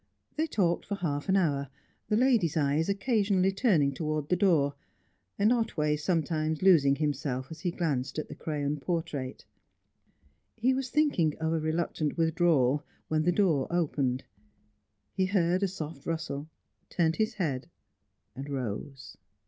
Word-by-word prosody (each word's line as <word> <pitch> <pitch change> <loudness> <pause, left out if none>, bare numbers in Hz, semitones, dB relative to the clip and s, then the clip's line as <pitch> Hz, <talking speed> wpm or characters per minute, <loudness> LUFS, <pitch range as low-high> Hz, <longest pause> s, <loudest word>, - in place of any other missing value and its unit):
They 315 +1 0
talked 175 - 0
for 200 - -2
half 155 -5 -3
an 190 - +4
hour, 140 -7 +1 0.4
the 210 - +3
lady's 230 - +3
eyes 150 +3 +1
occasionally 200 -3 +2
turning 190 - +2
towards 155 +1 -2
the 180 - +3
door, 165 -7 +3 0.6
and 210 +4 +4
Otway 155 -11 0
sometimes 155 0 -1
losing 150 -8 +6
himself 140 -3 -2
as 160 - -8
he 180 - -1
glanced 150 -7 -2
at 155 - -3
the - - -8
crayon 150 -1 -3
portrait. 145 -5 -3 1.1
He 245 +3 +2
was 260 -1 -2
thinking 250 - +2
of 160 0 -1
a 165 - +1
reluctant 155 -1 -1
withdrawal, 160 -4 +2 0.3
when 155 0 +2
the 175 +3 +2
door 170 -8 +2
opened. 140 -7 0 0.9
He 190 -1 +1
heard 185 -1 +2
a 200 - +2
soft 155 -6 -7
rustle, 155 -2 -3 0.4
turned 165 -1 +1
his 220 0 0
head, 145 -10 -2 0.7
and 135 +2 -7
rose. 130 +1 -5
160 Hz, 145 wpm, -29 LUFS, 145-190 Hz, 1.1 s, losing